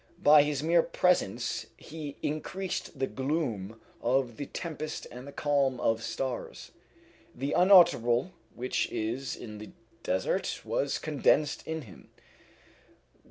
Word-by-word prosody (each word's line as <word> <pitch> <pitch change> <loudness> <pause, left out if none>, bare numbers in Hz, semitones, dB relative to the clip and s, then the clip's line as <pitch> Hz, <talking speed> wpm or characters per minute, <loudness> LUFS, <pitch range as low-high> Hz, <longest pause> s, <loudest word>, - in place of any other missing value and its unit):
By 150 0 +8
his 145 -1 -1
mere 170 +1 +5
presence 180 - 0
he 150 -2 -8
increased 165 +2 -3
the 135 - +1
gloom 130 - -3 0.2
of 125 -1 +1
the 145 - -5
tempest 155 -2 -5
and 125 +3 -9
the - - -8
calm 140 -3 +1
of 115 0 +1
stars. 120 +3 -4 0.6
The 135 +3 -3
unutterable 175 - +5 0.2
which 125 +1 -1
is 120 +4 -2
in 105 -2 -9
the 110 - -9 0.3
desert 95 0 -1
was 140 - 0
condensed 150 0 +1
in 160 -1 -3
him. 100 -7 -15
135 Hz, 120 wpm, -29 LUFS, 120-155 Hz, 0.6 s, By